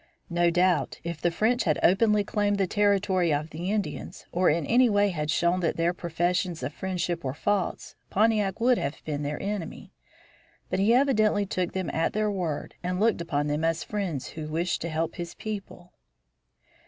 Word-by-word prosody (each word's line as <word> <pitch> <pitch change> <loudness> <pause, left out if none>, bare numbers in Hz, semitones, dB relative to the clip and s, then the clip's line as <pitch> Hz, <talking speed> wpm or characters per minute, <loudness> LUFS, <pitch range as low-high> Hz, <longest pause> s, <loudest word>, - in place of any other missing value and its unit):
No 175 0 +3
doubt 175 -2 +1
if 170 -2 -5
the 175 - +3
French 220 +8 +1
had 155 -4 +2
openly 210 +2 +4
claimed 205 0 0
the 195 - +2
territory 195 -3 +2
of 150 +2 -1
the 170 +4 -4
Indians, 210 -2 -4
or 180 +1 +3
in 160 0 +1
any 245 +1 +4
way 205 -1 +3
had 155 -4 -3
shown 175 +3 +2
that 170 -3 -1
their 170 +1 +2
professions 175 0 -1
of 145 - -3
friendship 175 -2 -3
were 130 0 -3
false, 200 +2 -1 0.2
Pontiac 210 -2 +2
would 245 +1 +3
have 140 +2 -2
been 150 -2 -3
their 145 0 -3
enemy. 200 -1 -5 0.8
But - - 0
he 200 +4 +4
evidently 215 -6 +3
took 185 -2 -2
them 190 -2 -2
at 165 - 0
their 215 0 +1
word 175 -7 -3
and 180 +1 -2
looked 220 -4 +2
upon 145 -3 -1
them 150 +2 -1
as 165 0 +1
friends 190 -10 -3
who 155 -1 -6
wished 165 +3 -1
to 170 - -3
help 160 +1 -2
his 170 -1 -6
people. 195 -4 -7
180 Hz, 185 wpm, -27 LUFS, 165-205 Hz, 0.8 s, openly